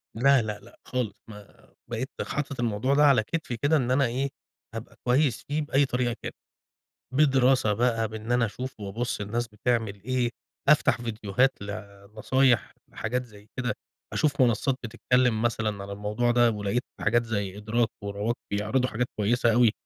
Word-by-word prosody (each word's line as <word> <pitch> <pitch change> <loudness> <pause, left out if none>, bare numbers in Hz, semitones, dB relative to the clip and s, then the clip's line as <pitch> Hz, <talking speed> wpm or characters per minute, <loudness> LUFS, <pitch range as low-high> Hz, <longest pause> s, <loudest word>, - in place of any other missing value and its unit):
لا، 135 +3 +5
لأ، 105 -2 -4
لأ - - -18
خالص 120 -6 -2
ما 105 -2 -14 0.2
بقيت 120 +3 -3 0.2
حاطط 140 -2 -3
الموضوع 120 +3 +1
ده 150 - +5
على 130 -6 +5
كتفي 130 -2 -3
كده 145 +7 +3
إن 125 -3 0
أنا 135 +1 +4
إيه، 130 +4 -1 0.5
هابقى 115 +1 -7
كويس 130 0 +2
فيه 150 +2 0
بأي 145 -1 +2
طريقة 125 -2 -1
كانت، - - -5 0.8
بدراسة 130 -5 +4
بقى 115 0 +1
بإني 110 +2 -4
أنا 120 -1 +3
أشوف 125 +2 -6
وأبُصّ 105 +3 -3
الناس 115 +4 -2
بتعمل 110 -2 -1
إيه، 125 0 0 0.4
أفتح 130 -5 +4
فيديوهات 115 +1 0
لنصايح 105 +5 0 0.2
لحاجات 125 +3 -2
زي 105 -3 -16
كده، 125 -2 0 0.4
أشوف 145 -3 +1
منصّات 125 +2 +3
بتتكلّم 120 0 +1
مثلًا 110 -3 -1
عن 100 - -9
الموضوع 105 +4 0
ده، 120 -1 +5
ولقيت 105 +3 -1 0.2
حاجات 120 +2 +3
زي 100 -3 -3
إدراك 110 +2 +1 0.2
ورواق 100 +3 -2 0.2
بيعرضوا 110 +6 +1
حاجات 120 +3 -1
كويسة 115 +2 +3
أوي، 120 -1 +5
120 Hz, 155 wpm, -27 LUFS, 105-130 Hz, 0.8 s, لا